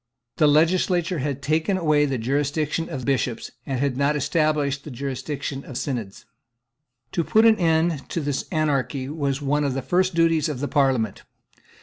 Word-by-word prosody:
The 150 - +5
legislature 175 +3 +2
had 140 0 -3
taken 160 +6 +1
away 155 -4 +3
the 135 -2 -1
jurisdiction 145 +6 -1
of 130 -2 -5
Bishops, 130 -4 -1 0.2
and 135 -3 -2
had 135 -2 0
not 140 +2 +2
established 145 -1 0
the - - -8
jurisdiction 140 +1 -4
of 130 - -7
Synods, 120 -10 -4 0.9
To 170 - 0
put 220 +7 +4
an 225 -1 +6
end 160 -3 +1
to - - -2
this 145 -3 -2
anarchy 140 -4 0
was 145 -2 -2
one 145 +2 +1
of 140 -2 -1
the 135 - -3
first 185 +2 +1
duties 165 -2 +3
of 145 -4 -4
the 145 - -2
Parliament. 130 -8 +1
145 Hz, 165 wpm, -23 LUFS, 135-160 Hz, 0.9 s, an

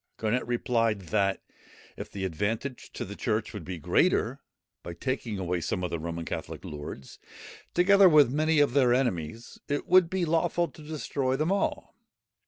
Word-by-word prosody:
Garnet 115 +3 0
replied, 115 -3 0
that, 100 -2 +1 0.5
if - - -7
the 95 -1 -4
advantage 110 - -3
to - - -4
the - - -8
church - - -2
would - - -6
be 90 -1 -5
greater, 75 - +1 0.4
by 85 - -8
taking 120 0 -3
away 90 -2 -2
some 90 +2 -2
of 90 - -2
the 85 - -2
Roman 85 +1 -5
Catholic - - -6
lords, 75 -3 -8 0.6
together 195 +2 +6
with 150 -6 +6
many 155 +2 +2
of 145 -4 +3
their 125 -3 +4
enemies, 115 - -2
it 145 0 -2
would 180 -1 +5
be 185 -1 0
lawful 170 +1 +1
to 145 - -15
destroy 140 -3 -2
them 155 +6 0
all. 200 0 -1
120 Hz, 170 wpm, -28 LUFS, 95-155 Hz, 0.6 s, together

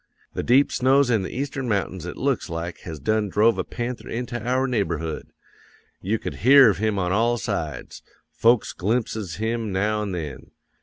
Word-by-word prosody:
The - - -2
deep 130 +4 +4
snows 135 0 +3
in 110 -4 +2
the 95 - -4
Eastern 135 -1 -3
mountains 95 -4 -2
it 90 - -7
looks 135 -6 -1
like 85 +1 -5
has 80 -3 -8
done 105 +7 0
drove 110 +4 +3
a - - +1
panther 120 +1 -5
into 120 0 -4
our 130 +2 +1
neighborhood. 85 - -2 0.7
You 105 +4 0
could - - -6
hear 135 -1 +7
of 95 - -5
him 110 -1 0
on 90 -2 0
all 115 +4 +2
sides. 95 - -4 0.3
Folks 115 -1 +2
glimpses 105 -3 -2
him 110 0 -2
now 105 +3 0
an' 100 -3 -3
then. 75 -6 -6
110 Hz, 175 wpm, -24 LUFS, 95-120 Hz, 0.7 s, hear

